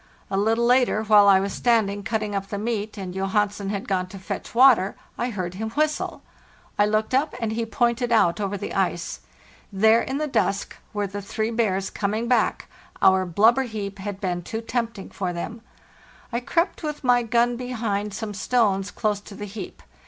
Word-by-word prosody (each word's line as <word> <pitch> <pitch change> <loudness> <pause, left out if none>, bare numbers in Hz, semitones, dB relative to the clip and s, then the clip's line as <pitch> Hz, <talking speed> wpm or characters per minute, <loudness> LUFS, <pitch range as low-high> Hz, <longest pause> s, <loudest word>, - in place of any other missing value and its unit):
<A - - 0
little 225 +4 +2
later, 245 -3 +3
while 210 -1 +6
I 195 -1 +7
was 195 0 -2
standing 215 -4 +1
cutting 215 +1 -2
up 195 -1 -2
the 205 - -4
meat 215 0 -3
and 185 -2 -5
Johansen 200 +1 -1
had 200 -1 -3
gone 185 -2 0
to 195 - -10
fetch 190 +4 -6
water, 240 -6 +6 0.2
I 240 - -2
heard 185 -6 -4
him 220 +4 -4
whistle. 305 +5 -1 0.5
1 205 0 +3
looked 215 +2 0
up, 275 +1 +1
and 225 -2 -1
he 225 +1 -2
pointed 240 +1 0
out 210 -4 +3
over 200 0 -2
the - - -5
ice. 175 -3 -1 0.5
There 220 +4 +4
in 265 - -3
the 305 - -1
dusk 200 -8 -1 0.2
were 205 -1 -1
the 200 +1 -5
three 220 +3 -2
bears 195 -5 0
coming 215 +3 -2
back—our 190 -5 +1
blubber 220 +9 +4
heap 205 -5 -5
had 195 0 -5
been 180 -3 -2
too 220 +6 -5
tempting 230 -3 -3
for 185 -2 -3
them. 220 +7 -5 0.7
I 235 - +1
crept 335 +8 0
with 300 -2 -4
my 245 -1 +4
gun 235 +1 +2
behind 220 -5 -3
some 215 -1 -4
stones 205 -3 +1
close 210 -2 -1
to 205 0 -12
the 205 - -6
heap. 200 -2 -8
210 Hz, 185 wpm, -24 LUFS, 195-235 Hz, 0.7 s, I